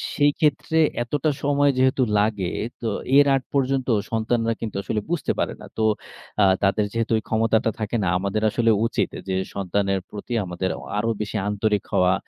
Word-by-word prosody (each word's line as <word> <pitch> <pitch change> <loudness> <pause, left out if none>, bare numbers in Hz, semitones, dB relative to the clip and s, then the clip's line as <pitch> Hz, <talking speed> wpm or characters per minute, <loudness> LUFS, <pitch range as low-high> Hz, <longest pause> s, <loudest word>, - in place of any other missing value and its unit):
সেইক্ষেত্রে 150 +2 +2 0.2
এতটা 145 +5 0
সময় 145 0 +3
যেহেতু 130 0 +3 0.2
লাগে, 105 -4 0 0.3
তো 115 - -2 0.3
এর 145 - +7
আগ 135 - 0
পর্যন্ত 135 -1 +1 0.2
সন্তানরা 115 +1 +1
কিন্তু 110 -2 -4
আসলে 105 +3 -1
বুঝতে 175 -2 0
পারে - - 0
না। - - -9
তো 110 - -1 0.6
আ - - +7 0.2
তাদের 100 +2 +2
যেহেতু 115 0 -1
ওই 110 - -4
ক্ষমতাটা 110 0 +2
থাকে 110 +2 -2
না, 95 - 0
আমাদের 100 +2 -1
আসলে 115 +1 +2
উচিত - - 0
এ - - -6
যে 95 - 0 0.2
সন্তানের 100 0 0
প্রতি 105 +4 -7
আমাদের 90 +1 -3
অ - - -11 0.2
আরো 115 +2 0
বেশি 105 +1 -3
আন্তরিক 105 0 0
হওয়া। 90 0 +4
110 Hz, 175 wpm, -23 LUFS, 100-130 Hz, 0.6 s, এর